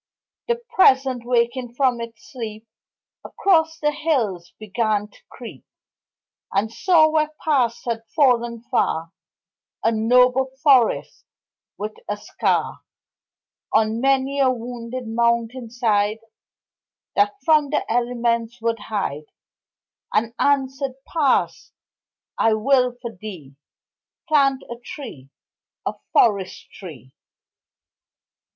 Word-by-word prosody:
The 475 Hz, -, +2 dB, 0.2 s
Present, 265 Hz, -8 st, +4 dB
waking 240 Hz, 0 st, 0 dB
from 250 Hz, -3 st, +1 dB
its 230 Hz, -2 st, -10 dB
sleep, 220 Hz, -4 st, -7 dB, 0.6 s
Across 320 Hz, -4 st, +1 dB
the 295 Hz, 0 st, +2 dB
hills 235 Hz, -, -1 dB
began 215 Hz, -1 st, -1 dB
to -, -, -21 dB
creep, -, -, -11 dB, 0.9 s
And 210 Hz, +3 st, 0 dB
saw 335 Hz, -1 st, +4 dB
where 310 Hz, -1 st, +1 dB, 0.2 s
Past 245 Hz, -6 st, +1 dB
had 230 Hz, -2 st, -2 dB
fallen 240 Hz, -5 st, +2 dB
far 165 Hz, +1 st, 0 dB, 0.7 s
A 225 Hz, -, +3 dB
noble 250 Hz, +4 st, +3 dB
forest, 260 Hz, -6 st, +3 dB, 0.5 s
with 210 Hz, +1 st, -4 dB, 0.2 s
a 205 Hz, -, -1 dB
scar -, -, -1 dB, 0.9 s
On 220 Hz, +1 st, +2 dB
many 270 Hz, +1 st, +1 dB
a 270 Hz, -1 st, +4 dB
wounded 245 Hz, 0 st, -5 dB
mountain 235 Hz, +1 st, 0 dB
side 215 Hz, -3 st, +1 dB, 1.0 s
That 205 Hz, 0 st, +2 dB
from 305 Hz, -3 st, +4 dB
the 295 Hz, -, 0 dB
elements 235 Hz, 0 st, -1 dB
would 230 Hz, 0 st, -1 dB
hide 170 Hz, -10 st, -3 dB, 0.9 s
And 225 Hz, +2 st, 0 dB
answered: 270 Hz, -1 st, +1 dB
Past, 295 Hz, -6 st, 0 dB, 0.7 s
I 225 Hz, -1 st, +4 dB
will 250 Hz, +2 st, +2 dB
for 235 Hz, -, -4 dB
thee 180 Hz, -9 st, -10 dB, 0.7 s
Plant 275 Hz, -4 st, +3 dB
a 235 Hz, 0 st, -9 dB
tree, 140 Hz, -, -9 dB, 0.6 s
A -, -, -1 dB, 0.2 s
forest 200 Hz, -4 st, +1 dB
tree. 135 Hz, -, -11 dB
235 Hz, 105 wpm, -22 LUFS, 220-265 Hz, 1.0 s, Present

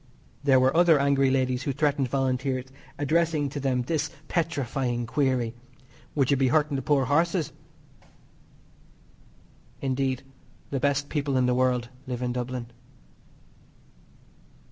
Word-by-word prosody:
There 135 Hz, -2 st, +5 dB
were 130 Hz, +3 st, +3 dB
other 170 Hz, -2 st, +6 dB
angry 140 Hz, -1 st, +3 dB
ladies 130 Hz, -1 st, +1 dB
who 140 Hz, -, -2 dB
threatened 140 Hz, -1 st, +1 dB
Volunteers, 130 Hz, 0 st, -1 dB, 0.3 s
addressing 155 Hz, 0 st, +1 dB
to 145 Hz, -, -5 dB
them 130 Hz, -2 st, 0 dB
this 155 Hz, +2 st, -1 dB, 0.2 s
petrifying 135 Hz, -7 st, -1 dB
query: 125 Hz, -2 st, 0 dB, 0.6 s
"Would 140 Hz, -2 st, +2 dB
you 140 Hz, -, +4 dB
be 130 Hz, 0 st, +3 dB
hurting 150 Hz, +2 st, +2 dB
the 135 Hz, -, -1 dB
poor 140 Hz, -2 st, +2 dB
horses?" 165 Hz, +3 st, +1 dB, 2.3 s
Indeed, 130 Hz, -1 st, -1 dB, 0.5 s
the 135 Hz, -, -1 dB
best 140 Hz, +1 st, +1 dB
people 145 Hz, -3 st, -1 dB
in 130 Hz, -, +3 dB
the 125 Hz, -, +2 dB
world 125 Hz, -1 st, +1 dB, 0.2 s
live 125 Hz, -1 st, -3 dB
in 125 Hz, 0 st, -1 dB
Dublin. 125 Hz, -1 st, -4 dB
135 Hz, 125 wpm, -26 LUFS, 125-145 Hz, 2.3 s, other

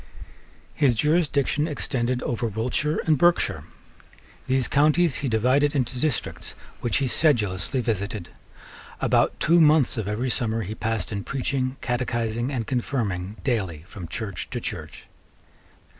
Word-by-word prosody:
His 130 Hz, -5 st, +3 dB
jurisdiction 150 Hz, +1 st, +1 dB
extended 125 Hz, -5 st, -1 dB
over 120 Hz, 0 st, -1 dB
Wiltshire 125 Hz, +8 st, -1 dB
and 155 Hz, -4 st, +3 dB
Berkshire. 175 Hz, 0 st, +2 dB, 0.8 s
These 130 Hz, -1 st, +3 dB
counties 155 Hz, +2 st, +3 dB
he 135 Hz, -, -2 dB
divided 130 Hz, +6 st, +2 dB
into 125 Hz, -2 st, -1 dB
districts 150 Hz, -3 st, -2 dB, 0.2 s
which 120 Hz, -, 0 dB
he 140 Hz, -, 0 dB
sedulously 115 Hz, -, +2 dB
visited. 105 Hz, -4 st, -3 dB, 0.7 s
About -, -, +2 dB
two 170 Hz, +2 st, +4 dB
months 150 Hz, -5 st, +5 dB
of 110 Hz, -3 st, -2 dB
every 120 Hz, +5 st, -1 dB
summer 115 Hz, -3 st, -1 dB
he 100 Hz, +3 st, -5 dB
passed 110 Hz, 0 st, -2 dB
in 100 Hz, -2 st, -3 dB
preaching, 135 Hz, -1 st, -2 dB
catechizing, 120 Hz, 0 st, -1 dB
and 120 Hz, -5 st, -2 dB
confirming 110 Hz, -7 st, -2 dB
daily 95 Hz, -, -1 dB
from 90 Hz, -4 st, -8 dB
church 100 Hz, 0 st, -5 dB
to -, -, -3 dB
church. -, -, -6 dB
125 Hz, 130 wpm, -24 LUFS, 110-140 Hz, 0.8 s, months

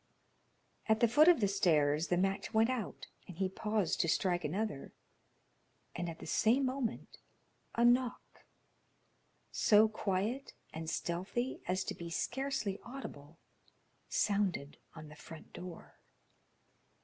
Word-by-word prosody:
At 220 Hz, 0 st, +4 dB
the 235 Hz, -, +5 dB
foot 295 Hz, +8 st, +5 dB
of 345 Hz, -8 st, +6 dB
the 200 Hz, -, +4 dB
stairs 155 Hz, -5 st, +2 dB
the 175 Hz, -, +1 dB
match 195 Hz, +3 st, -1 dB
went 225 Hz, +3 st, +4 dB
out, 245 Hz, -5 st, -4 dB, 0.2 s
and 180 Hz, -, -10 dB
he 190 Hz, 0 st, +1 dB
paused 210 Hz, -1 st, 0 dB
to -, -, 0 dB
strike 180 Hz, 0 st, +1 dB
another; 155 Hz, -1 st, -3 dB, 1.0 s
and 175 Hz, 0 st, -3 dB
at 165 Hz, -, -7 dB
the -, -, -10 dB
same 250 Hz, +5 st, +3 dB
moment 255 Hz, -3 st, -3 dB, 0.6 s
a 235 Hz, -, +3 dB
knock, 245 Hz, 0 st, +1 dB, 1.1 s
so 215 Hz, +1 st, +5 dB
quiet 215 Hz, +5 st, -2 dB, 0.2 s
and 160 Hz, 0 st, -5 dB
stealthy 190 Hz, +11 st, -2 dB
as 185 Hz, +1 st, 0 dB
to -, -, -4 dB
be 170 Hz, 0 st, -7 dB
scarcely 235 Hz, +1 st, -2 dB
audible, 165 Hz, -, -9 dB, 0.7 s
sounded 195 Hz, -8 st, 0 dB, 0.2 s
on 155 Hz, -1 st, -9 dB
the 150 Hz, -, -12 dB
front 160 Hz, +1 st, -12 dB
door. 175 Hz, -1 st, -10 dB
195 Hz, 130 wpm, -34 LUFS, 170-235 Hz, 1.1 s, of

